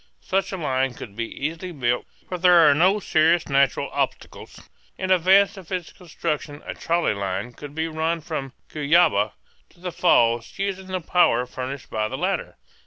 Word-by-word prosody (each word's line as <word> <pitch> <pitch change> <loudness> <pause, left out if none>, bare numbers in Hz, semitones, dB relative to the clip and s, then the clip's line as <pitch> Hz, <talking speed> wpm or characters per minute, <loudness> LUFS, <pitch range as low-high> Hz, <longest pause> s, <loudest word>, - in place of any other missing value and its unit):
Such 195 +1 -1
a 190 - -4
line 130 -5 -1
could 100 -3 -10
be 115 +1 -2
easily 165 +5 -4
built, 125 -6 -1 0.2
for 180 - -5
there 175 -2 +6
are 145 - +6
no 185 +7 +3
serious 165 -2 +2
natural 140 -2 +2
obstacles. - - -4 0.3
In 185 0 -2
advance 190 +3 +4
of 190 -2 -12
its 180 -3 -4
construction 150 -4 -5
a - - -5
trolley 170 -7 0
line 100 +3 -4
could 145 +3 -10
be 160 +1 -1
run 160 +1 -1
from 145 -4 -5 0.2
Cuyaba 150 -9 +3 0.4
to 170 - -25
the 180 0 -5
falls, 120 -10 +2
using 195 -1 -3
the 185 -1 -3
power 160 -8 +3
furnished 130 +1 -7
by 110 -1 -1
the - - -5
latter. - - -2
160 Hz, 175 wpm, -23 LUFS, 130-180 Hz, 0.4 s, there